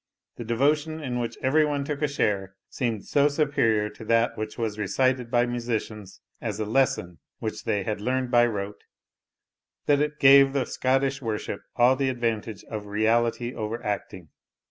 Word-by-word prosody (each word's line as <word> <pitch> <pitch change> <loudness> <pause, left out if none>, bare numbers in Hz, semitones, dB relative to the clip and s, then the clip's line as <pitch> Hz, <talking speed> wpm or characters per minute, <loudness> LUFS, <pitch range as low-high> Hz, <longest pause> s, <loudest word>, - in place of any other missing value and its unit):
The 120 - -5
devotion 145 +7 +1
in 125 -5 -3
which 120 -1 -4
every 150 +4 +4
one 145 -2 -1
took 145 0 -4
a 150 - +2
share 100 -8 -1 0.2
seemed 115 -5 -2
so 145 0 +3
superior 135 -8 +1
to 110 - -11
that 115 +1 +2
which 110 0 -5
was 110 -2 -3
recited 125 +4 0
by 120 0 +3
musicians 115 -4 -4 0.2
as 110 -3 -4
a 110 - -1
lesson 105 - 0 0.2
which - - -5
they 100 -2 0
had 105 +1 -3
learned 130 +2 -1
by 120 -1 +5
rote, 105 -2 -5 1.0
that 145 -1 +3
it 150 0 -1
gave 135 0 +7
the 135 -3 0
Scottish 135 +2 0
worship 110 -3 -4
all 125 +2 +5
the 135 0 0
advantage 115 -4 -2
of 105 -2 -7
reality 115 +3 +1
over 110 +2 -4
acting. 95 -5 -4
120 Hz, 165 wpm, -26 LUFS, 110-135 Hz, 1.0 s, gave